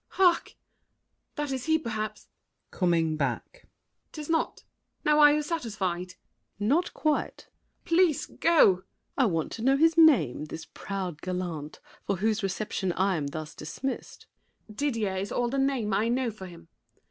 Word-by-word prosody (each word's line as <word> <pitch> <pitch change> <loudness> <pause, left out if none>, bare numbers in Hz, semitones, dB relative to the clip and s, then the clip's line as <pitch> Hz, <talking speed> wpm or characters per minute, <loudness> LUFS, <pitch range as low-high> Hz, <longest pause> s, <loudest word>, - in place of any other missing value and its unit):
Hark! 360 -3 +3 0.8
that 295 -1 -3
is 260 -2 -3
he 320 0 +3
perhaps. 215 -7 -5 0.4
[Coming 165 -4 +1
back.] 140 - -3 0.4
'Tis 305 0 -5
not. 320 - -1 0.4
Now 300 0 +4
are 295 -1 +8
you 300 0 +1
satisfied? 195 - -3 0.4
SAVERNY. 205 +1 -2
Not 335 +6 +2
quite! 305 -1 -1
MARION. - - -47
Please 335 -3 +3
go! 335 0 +1
SAVERNY. 185 -8 +5 0.3
I 260 - +5
want 165 -7 -1
to 225 - -6
know 270 +3 +3
his 325 +2 +4
name, 255 - +5
this 160 +1 -8
proud 185 -5 -5
gallant, 175 -5 -4 0.3
For 200 - +1
whose 215 +3 0
reception 195 -1 -2
I 190 +1 +1
am 150 -3 -2
thus 155 +2 -6
dismissed. 165 - -6 0.4
MARION. 215 - -13
Didier 225 -9 -1
is 195 +2 -3
all 245 -1 0
the 275 +2 -1
name 265 -7 0
I 210 +4 +2
know 245 0 0
for 195 -3 -9
him. 170 -2 -14
215 Hz, 160 wpm, -28 LUFS, 180-290 Hz, 0.8 s, are